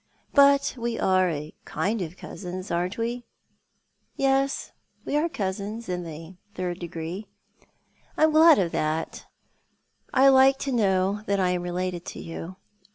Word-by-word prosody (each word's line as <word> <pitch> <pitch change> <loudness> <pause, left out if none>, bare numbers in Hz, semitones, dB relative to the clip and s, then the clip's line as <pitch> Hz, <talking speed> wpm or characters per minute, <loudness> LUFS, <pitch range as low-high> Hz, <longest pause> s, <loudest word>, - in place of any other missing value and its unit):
But 280 0 +5
we 235 0 -2
are 185 -1 +3
a 150 -1 -5
kind 215 +2 -2
of 175 +1 -6
cousins, 185 +1 -7
aren't 175 +3 -1
we? 235 +2 -2 0.4
" - - -47
" - - -47
Yes, 270 0 +1 0.3
we - - -2
are 310 +3 +2
cousins— 205 - -4
in 180 -1 -2
the 165 +2 -9 0.2
third 180 -1 -3
degree." 170 +4 -6 0.4
" - - -37
I'm 315 0 +4
glad 320 +1 +7
of 180 -4 +1
that. 155 +1 -2 0.8
I 270 +1 +5
like 265 0 +6
to 275 - -2
know 200 -3 +1
that 200 0 +1
I 180 -1 +2
am 180 -1 -1
related 175 0 -3
to - - -7
you. 165 +2 -7
190 Hz, 160 wpm, -26 LUFS, 175-245 Hz, 0.8 s, glad